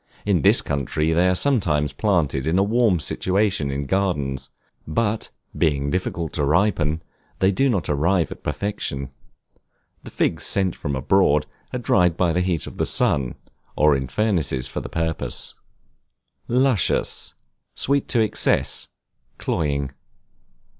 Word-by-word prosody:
In 100 -6 +2
this - - +5
country 75 +3 -1
they 90 +3 +3
are 90 - +2
sometimes 90 - +1
planted 80 -10 0
in 85 +3 +2
a 95 - +4
warm 110 -3 +2
situation 95 0 0
in 70 +1 -3
gardens, 70 -8 -1 0.4
but, 105 +7 -1 0.3
being 70 -3 +1
difficult 85 -4 -2
to 75 - -1
ripen, 80 0 +1 0.3
they 95 +1 +3
do 135 +8 +2
not 100 -8 0
arrive 85 +4 +1
at - - -8
perfection. 75 -6 -3 0.9
The - - -9
figs - - -1
sent 95 -3 +2
from 70 -1 -3
abroad 75 +1 +3 0.3
are - - -2
dried 90 -8 +2
by 85 -2 +2
the 90 - +1
heat 90 -3 -1
of - - -10
the - - +2
sun, 65 -4 +1 0.4
or 75 -1 +4
in 65 -1 -2
furnaces 80 - 0
for - - -4
the - - -7
purpose. 80 -1 -2 0.9
Luscious, 125 -4 +1 0.4
sweet 140 0 +1
to 120 - +2
excess, 110 - +1 0.5
cloying. 70 -4 -1
85 Hz, 140 wpm, -22 LUFS, 70-100 Hz, 0.9 s, this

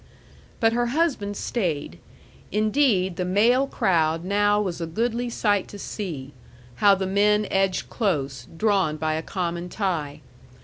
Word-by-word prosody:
But 225 -2 +3
her 240 0 +1
husband 230 -12 0
stayed. 155 - -2 0.5
Indeed, 210 -4 +2
the 180 - -1
male 230 +9 +3
crowd 165 - +1
now 205 +1 +2
was 180 -5 -2
a 165 - -2
goodly 235 +7 -1
sight 205 -4 +1
to 205 - -10
see, 160 -10 -6 0.4
how 200 +5 +6
the 190 0 -2
men 210 +2 +2
edged 195 -1 +1
close, 140 - -2
drawn 190 -6 +1
by 155 0 -1
a 160 - -1
common 175 -1 -3
tie. 160 -8 -2
195 Hz, 140 wpm, -24 LUFS, 165-215 Hz, 0.5 s, how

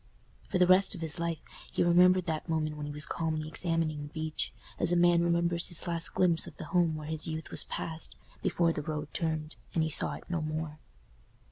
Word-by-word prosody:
For - - 0
the 180 - +5
rest 185 +3 +7
of 175 - -8
his 160 +1 +1
life 170 -1 -1 0.3
he - - +1
remembered 180 +1 +5
that 160 0 -3
moment 155 -1 -1
when 150 -1 -5
he - - -5
was 150 +1 -2
calmly 155 -2 -2
examining 165 -2 -1
the 145 - -6
beech, 155 -1 -3 0.3
as - - +4
a - - +3
man 175 0 +5
remembers 170 0 +2
his 175 - 0
last 170 -1 -1
glimpse 175 -3 +3
of - - -10
the - - -7
home 170 -3 +3
where 155 -1 -6
his 155 +1 -3
youth 160 0 -5
was - - 0
passed, 160 -1 -4 0.3
before 170 -1 +1
the 150 - -3
road 150 0 -5
turned, 160 -2 -2 0.2
and 165 - +3
he 160 - -1
saw - - 0
it - - -11
no 170 -2 -2
more. 155 0 -4
165 Hz, 220 wpm, -30 LUFS, 155-170 Hz, 0.3 s, rest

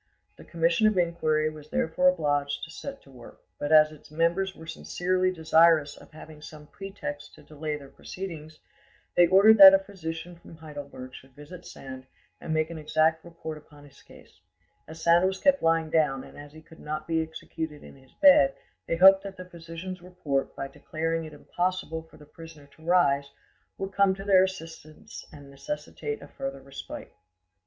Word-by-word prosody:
The - - -14
commission 170 +5 +1
of 215 -3 +1
inquiry 160 -3 +1
was 150 -1 -13
therefore 160 +4 +1
obliged 145 -5 -1
to 165 - -7
set 275 +10 -8
to 135 - -18
work; 125 - -14 0.2
but 145 - -3
as 155 -1 +6
its 155 - -16
members 170 +5 0
were 160 - -12
sincerely 185 +3 -1
desirous 160 -3 +3
of - - -16
having 155 -1 -13
some 150 0 -11
pretext 200 - -8
to - - -17
delay 150 0 -5
their 140 -2 -12
proceedings, 155 -1 -9 0.6
they 175 -1 +6
ordered 200 +4 +6
that 195 -1 +12
a - - +6
physician 175 -3 -7
from 170 -1 -15
Heidelberg 145 -4 -10
should 135 -1 -14
visit 150 +5 -12
Sand 130 -1 -10 0.3
and - - -6
make 155 +1 0
an 165 - -7
exact 155 +1 +1
report 160 -2 -8
upon 145 -1 -18
his 140 -1 -18
case; - - -19 0.5
as 160 +1 -10
Sand 170 +2 +4
was 190 0 -2
kept 280 +5 +3
lying 165 -1 +1
down 150 -4 +1
and - - -14
as 145 0 -11
he 155 0 -14
could 160 0 -17
not 155 +1 -5
be 165 -1 +1
executed 160 -1 -7
in - - -13
his 130 -1 -22
bed, 140 - +7 0.3
they - - 0
hoped 190 +3 +7
that 195 -1 -9
the 185 - -8
physician's 175 +1 -9
report, 175 -7 -3
by 135 - -5
declaring 165 +3 -4
it 155 - -10
impossible 175 +1 -3
for 160 - -19
the 150 - -15
prisoner 160 -1 -13
to 160 - -19
rise, 145 -5 +2 0.5
would 195 0 -5
come 200 -1 +3
to 195 - -8
their 195 -2 +5
assistance 165 -4 -8
and 140 -2 -13
necessitate 300 - -6
a - - -11
further 135 0 -6
respite. 135 0 -9
160 Hz, 185 wpm, -27 LUFS, 150-180 Hz, 0.6 s, that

